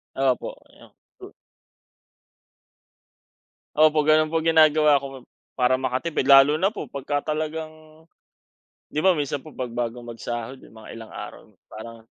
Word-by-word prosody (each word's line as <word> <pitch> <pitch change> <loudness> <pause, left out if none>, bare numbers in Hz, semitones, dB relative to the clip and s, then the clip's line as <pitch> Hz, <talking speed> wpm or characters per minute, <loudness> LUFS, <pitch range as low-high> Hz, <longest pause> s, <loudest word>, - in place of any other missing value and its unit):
Opo, - - -1 0.2
'yong - - -18 0.3
to 385 +1 -12 2.4
Opo, 155 0 +4
gano'n 155 0 +4
po 165 - +1
ginagawa 155 -2 +4
ko 135 -2 -10 0.3
para 125 +1 +3
makatipid. 130 +5 -2
Lalo 135 +2 +7
na 190 +6 +1
po 215 - -7
pagka 145 +2 -3
talagang 155 0 -7 0.9
'di 150 - 0
ba, 185 -2 +3
minsan 145 -1 -3
po 155 - -13
'pag 125 -5 -6
bago 120 0 -3
magsahod, 120 +2 -6
mga 110 -1 -13
ilang 115 -1 -10
araw - - -10 0.2
parang 115 +1 -11
150 Hz, 130 wpm, -23 LUFS, 125-155 Hz, 2.4 s, Lalo